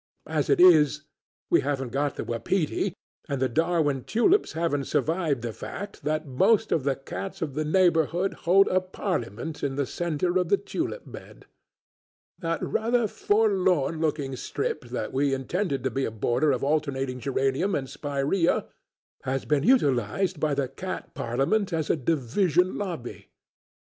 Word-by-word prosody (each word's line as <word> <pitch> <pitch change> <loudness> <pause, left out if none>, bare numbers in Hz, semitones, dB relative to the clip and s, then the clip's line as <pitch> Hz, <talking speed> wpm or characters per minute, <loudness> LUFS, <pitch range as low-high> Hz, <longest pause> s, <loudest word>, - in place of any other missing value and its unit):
As 155 -2 -1
it - - +3
is, 155 -4 +6 0.5
we - - +5
haven't 135 -3 -2
got 140 +1 -1
the - - -4
wapiti, 150 +8 -1 0.3
and 140 - -1
the 130 - +2
Darwin 150 -1 +1
tulips 350 - +2
haven't 160 -4 -1
survived 160 -7 0
the 115 -2 -3
fact 205 - -8
that 155 +1 0
most 210 - +2
of 155 - +2
the 140 -1 +2
cats 190 +8 -7
of 145 -4 -4
the 155 +3 -1
neighbourhood 175 +2 +2 0.2
hold 195 +2 +6
a 185 0 +2
parliament 160 - -4
in 135 -1 -1
the 140 0 0
centre 175 +4 -1
of 180 - -1
the 400 - +4
tulip 440 +4 -4
bed; - - -12 0.9
that 165 -2 -2
rather 230 0 +1
forlorn 190 -8 +1
looking 145 -4 -1
strip 130 0 -3
that 120 +1 -4
we 135 0 +2
intended 140 +1 -2
to 130 - 0
be 135 +4 -1
a - - -1
border 120 +7 +1
of 130 -1 -1
alternating 135 -3 -1
geranium 135 +8 0
and 135 -2 -2
spiræa 145 +6 0 0.6
has 135 +1 -2
been 150 -2 +2
utilised 160 - +2
by 150 -2 +1
the 135 -1 0
cat 185 +8 -6
parliament 140 - 0
as 160 -2 0
a - - +2
division 165 - +1
lobby. 170 -12 -6
150 Hz, 155 wpm, -26 LUFS, 135-180 Hz, 0.9 s, is